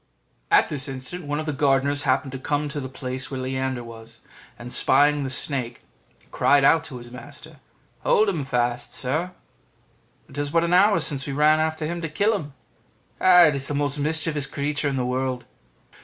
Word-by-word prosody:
At - - +5
this 140 -3 -2
instant 135 +5 -7
one 145 +1 -2
of 155 - -4
the 150 - -2
gardeners 140 0 +1
happened 135 0 0
to 135 - -6
come 145 +2 -1
to 145 +1 -5
the 130 -2 -6
place 130 0 -5
where 135 - -5
Leander 130 -1 -3
was, 115 -1 -13 0.4
and 120 +1 -7
spying 145 +2 +3
the 135 - -3
snake, 130 -3 -3 0.5
cried 140 -1 +3
out 165 +2 +5
to 135 -6 -8
his 120 0 -12
master, 140 +4 -11 0.4
"Hold 215 - +3
him 170 -7 -1
fast, 120 -2 -2
sir; 155 +8 -2 1.0
it 145 - -8
is 145 0 -1
but 165 +2 +2
an 170 +1 0
hour 200 +3 +5
since 140 -2 0
we 140 - -3
ran 150 +2 +4
after 160 0 -1
him 170 +2 -4
to 165 - -4
kill 205 +8 +1
him: 150 -8 -6 0.7
it 175 -5 +6
is 140 0 -2
the 145 - -2
most 145 0 -1
mischievous 150 -1 -1
creature 145 +1 -2
in 135 - -3
the 125 -2 -1
world." 125 0 -2
140 Hz, 190 wpm, -23 LUFS, 130-155 Hz, 1.0 s, it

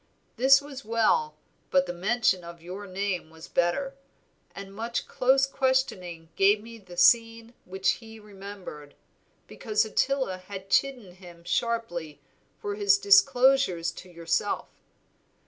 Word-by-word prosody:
This 270 +4 +5
was 280 -2 -9
well, 215 -9 +1 0.3
but 185 0 +3
the 175 - -5
mention 195 0 +1
of 170 0 -10
your 185 +4 -8
name 185 -3 -3
was 160 0 -13
better, 175 +11 0 0.6
and 195 0 -9
much 230 +3 -4
close 265 +2 +3
questioning 260 -12 -1
gave 200 +2 +4
me 230 +1 -12
the 180 -3 -14
scene 230 +4 +3
which 190 +1 -4
he 225 -1 -12
remembered, 195 -8 -11 0.5
because 215 -1 -1
Ottila 255 -3 -1
had 190 +1 -10
chidden 250 -9 0
him 175 -2 -14
sharply 175 -7 -2 0.4
for 205 - -4
his 200 -1 +3
disclosures 200 -1 +4
to 185 - -12
yourself. 170 -1 -2
200 Hz, 130 wpm, -27 LUFS, 175-230 Hz, 0.6 s, This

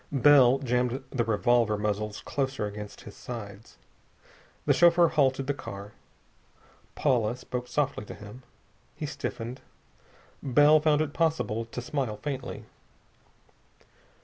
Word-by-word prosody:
Bell 135 -2 +6
jammed 125 0 -1
the 120 - 0
revolver 115 0 +2
muzzles 105 0 -2
closer 135 -5 -2
against 105 0 -7
his 105 - -11
sides. 105 - -9 0.9
The - - +4
chauffeur 170 -1 +5
halted 135 -2 +2
the 145 - 0
car. 100 -7 -8 1.0
Paula 120 -5 +1
spoke 125 -1 -5
softly 140 -5 -1
to - - -9
him. 105 +5 -11 0.5
He - - -5
stiffened. 120 +3 -5 0.8
Bell 145 +4 +5
found 150 0 +3
it 155 -2 -2
possible 160 -9 0
to 115 +2 -6
smile 125 -5 -2
faintly. 130 +1 -5
125 Hz, 120 wpm, -28 LUFS, 105-140 Hz, 1.0 s, Bell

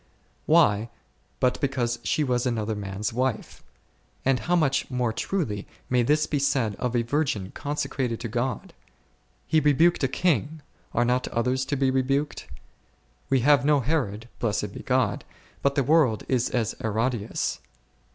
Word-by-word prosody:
Why, 115 -9 +4 0.5
but 125 -1 +1
because 125 -4 0
she 155 - +1
was 125 -2 0
another 110 -2 -1
man's 100 +1 -4
wife; 130 0 -2 0.6
and 135 -1 +3
how 175 +10 0
much 150 -6 +1
more 125 -3 -1
truly 115 - -2 0.2
may 125 -1 +4
this 150 +5 +2
be 145 - -1
said 130 -6 +1
of 125 -1 -2
a 120 - +2
virgin 120 -7 -1
consecrated 140 -5 -3
to 120 - -3
God! 120 +1 -3 0.7
He 160 - +3
rebuked 155 +3 +3
a - - +4
king; 155 +1 0 0.3
are 120 - +3
not 125 +1 +1
others 125 +3 0
to 140 +2 -1
be 135 -1 +2
rebuked? 135 +3 -1 0.8
We 135 -2 +3
have 145 0 +5
no 145 0 +4
Herod, 120 -7 -1
(blessed 105 -3 -1
be - - -8
God - - 0 0.2
!) - - -29
but 140 0 +1
the 140 - +2
world 135 -6 +3
is 125 -2 +1
as 115 -3 -1
Herodias. 115 0 -1
130 Hz, 155 wpm, -26 LUFS, 115-145 Hz, 0.8 s, have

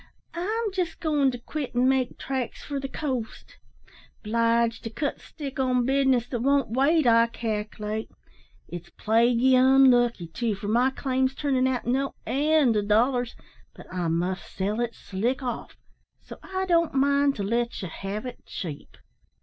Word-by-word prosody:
I'm 425 +5 -2
jest 365 -3 -2
goin' 295 -4 +2
to 250 - -4
quit 270 +2 -6
an' 250 +1 +3
make 265 -2 +1
tracks 260 -3 -4
for 285 -2 -3
the 270 - -4
coast. 260 -5 -5 0.6
'Bliged 230 +1 +1
to - - -2
cut 285 +6 -3
stick 275 -4 -8
on 250 -2 +2
business 265 -2 +2
that 240 - -2
won't 275 -1 +2
wait, 280 +5 +3
I 230 -1 +5
calc'late. 215 -1 -4 0.6
It's 175 -1 -8
plaguey 235 +3 +3
unlucky, 255 -5 +5
too, 215 +6 -2
for 200 +1 -6
my 245 +4 +3
claim's 265 0 -1
turnin' 265 -3 +1
out 255 -2 -1
no 270 +3 0
end 290 -3 +3
o' - - +2
dollars, 240 +4 +1 0.4
but - - -12
I 180 -2 -1
must 175 +3 -2
sell 200 +4 -2
it 235 -1 -2
slick 235 +8 -2
off 245 -2 -5 0.4
so - - -12
I 380 0 -3
don't 335 -4 +2
mind 280 +1 +3
to 200 - -3
let 235 +4 -1
ye - - -3
have 195 +6 -5
it 250 - -8
cheap." 155 -6 -7
250 Hz, 160 wpm, -26 LUFS, 225-275 Hz, 0.6 s, I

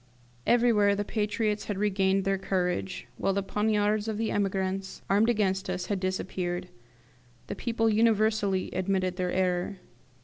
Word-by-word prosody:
Everywhere 225 -4 +4
the 205 +1 -2
patriots 210 0 -1
had 205 - -3
regained 195 -1 +1
their 195 -1 +1
courage, 185 0 -2
while 195 - +1
the 200 0 0
poniards 210 +1 +1
of 220 -1 -2
the 225 0 -1
emigrants, 195 -1 -2
armed 210 +4 +4
against 195 -4 0
us, 180 0 -2
had 195 - -1
disappeared. 185 -1 -3 0.8
The - - -5
people 225 +2 0
universally 215 -3 +2
admitted 185 -1 -1
their 180 -1 -1
error. 185 +1 0
195 Hz, 140 wpm, -28 LUFS, 185-210 Hz, 0.8 s, Everywhere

